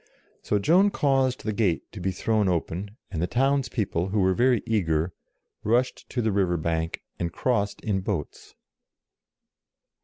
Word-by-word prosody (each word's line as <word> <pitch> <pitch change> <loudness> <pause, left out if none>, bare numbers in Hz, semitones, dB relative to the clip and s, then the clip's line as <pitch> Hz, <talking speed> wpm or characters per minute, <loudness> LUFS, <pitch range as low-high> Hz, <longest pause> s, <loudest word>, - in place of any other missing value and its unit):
So 105 - 0
Joan 175 - +4
caused 135 -6 +1
the 110 - -1
gate 95 -9 +1
to 105 - -8
be 95 +1 -1
thrown 105 +2 +1
open, 90 +5 -3
and 85 -4 -3
the 90 - +1
town's 135 +2 +1
people, 95 -7 -1
who 105 +2 0
were 95 -1 +3
very 120 +2 +3
eager, 85 -7 0 0.5
rushed 120 +4 0
to 120 - -1
the 110 - +2
river 95 -3 +1
bank, 80 0 -2 0.2
and 85 0 -1
crossed 105 -1 0
in 100 -4 0
boats. 90 -6 -5
100 Hz, 155 wpm, -26 LUFS, 90-120 Hz, 0.5 s, Joan